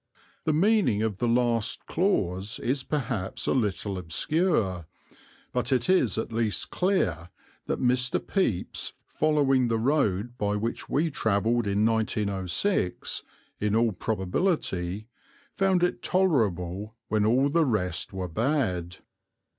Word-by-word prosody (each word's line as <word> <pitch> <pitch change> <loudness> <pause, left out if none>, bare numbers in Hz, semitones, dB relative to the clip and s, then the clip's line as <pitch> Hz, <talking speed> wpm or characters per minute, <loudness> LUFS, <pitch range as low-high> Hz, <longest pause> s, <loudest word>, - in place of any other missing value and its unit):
The 160 - +3
meaning 175 - +3
of 110 -4 -1
the 120 - +1
last 115 -2 +1
clause 105 - 0
is 130 +2 -1
perhaps 125 -10 -3
a - - +2
little 100 -5 -1
obscure; 95 - 0 0.7
but 125 +1 -1
it 130 +5 +2
is 130 - +2
at 110 - -3
least 110 -2 -1
clear 90 - 0 0.4
that - - -1
Mr. 125 0 +1
Pepys, 115 - -2
following 140 -5 +2
the 115 -1 +1
road 120 -3 0
by 105 0 0
which 110 +3 -3
we 160 +3 +1
travelled 110 -1 +1
in 100 +2 +2
1906 105 - 0 0.4
in 105 0 0
all 115 0 +3
probability, 95 - -1 0.5
found 190 -2 +2
it 180 - 0
tolerable 105 - 0
when 110 -1 +1
all 125 +6 +3
the 165 +3 +3
rest 90 -7 -1
were 95 -1 -4
bad. 95 - -1
115 Hz, 125 wpm, -27 LUFS, 100-140 Hz, 0.7 s, The